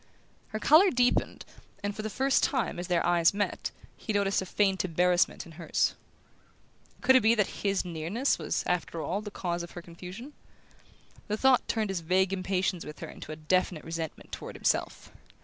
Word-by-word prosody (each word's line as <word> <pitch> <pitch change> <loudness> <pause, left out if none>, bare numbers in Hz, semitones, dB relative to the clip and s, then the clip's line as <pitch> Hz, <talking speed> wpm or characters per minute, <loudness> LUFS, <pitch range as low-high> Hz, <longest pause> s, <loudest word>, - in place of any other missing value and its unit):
Her 215 - -4
colour 315 - +6
deepened, 245 -5 +1 0.4
and 205 0 -2
for 215 - -4
the 215 - -3
first 265 +5 +2
time, 260 -10 0
as 175 - -4
their 175 -2 +1
eyes 175 +1 +4
met, 205 0 -1 0.3
he 220 - -4
noticed 200 -1 +2
a 190 - -6
faint 195 0 +1
embarrassment 180 0 +2
in 170 - -12
hers. 160 -1 0 1.1
Could 260 +1 +5
it 260 - +7
be 225 +2 +4
that 210 -4 -1
his 195 -2 0
nearness 175 - -1
was, - - -1
after 175 -1 -1
all, 190 +5 -2
the 210 - -6
cause 175 -3 -3
of 170 - -8
her 175 - -7
confusion? 180 - -10 0.9
The 210 - -1
thought 265 +1 +4
turned 215 -3 0
his 190 - -2
vague 185 +3 +2
impatience 185 -1 -1
with 150 - -9
her - - -6
into - - -9
a - - -5
definite 160 +1 0
resentment 165 -1 -6
toward - - -7
himself. - - -1
190 Hz, 185 wpm, -29 LUFS, 175-215 Hz, 1.1 s, it